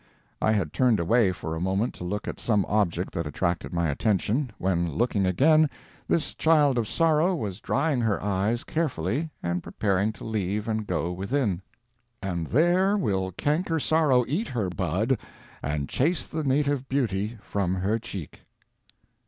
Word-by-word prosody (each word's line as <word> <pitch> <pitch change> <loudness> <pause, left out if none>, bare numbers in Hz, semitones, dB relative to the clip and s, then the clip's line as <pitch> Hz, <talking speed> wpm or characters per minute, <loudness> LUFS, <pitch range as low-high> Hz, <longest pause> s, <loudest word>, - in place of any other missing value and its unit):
I 110 - +3
had 95 -8 -1
turned 125 -5 +3
away 100 +4 +3
for 80 -3 -5
a 80 - -4
moment 95 +5 0
to - - -9
look 100 +3 -3
at - - -5
some 105 -4 +1
object 95 -4 0
that 85 -2 -2
attracted 85 +3 -2
my 85 -1 0
attention, 110 - 0
when 85 -2 0
looking 100 -2 +1
again, 155 - +4 0.4
this 165 - 0
child 150 -5 +3
of 110 - -1
sorrow 165 - +2
was 105 - -4
drying 135 +2 0
her 110 -4 +1
eyes 105 +5 0
carefully 150 - -1
and 85 0 -1
preparing 100 +2 0
to - - -12
leave 105 -1 -2
and 110 -1 -2
go 85 - -1
within— 100 +1 -1 0.6
"And 85 -5 -3
there 180 - +3
will 95 - 0
canker 160 - 0
sorrow 145 -6 +3
eat 180 - -1
her 110 -7 -2
bud, 95 - 0 0.4
And 70 -1 -2
chase 160 +6 +1
the 160 0 -4
native 140 -1 +1
beauty 115 -4 -1
from 95 -2 -1
her 100 +5 0
cheek." 100 -9 -7
110 Hz, 160 wpm, -26 LUFS, 95-140 Hz, 0.6 s, again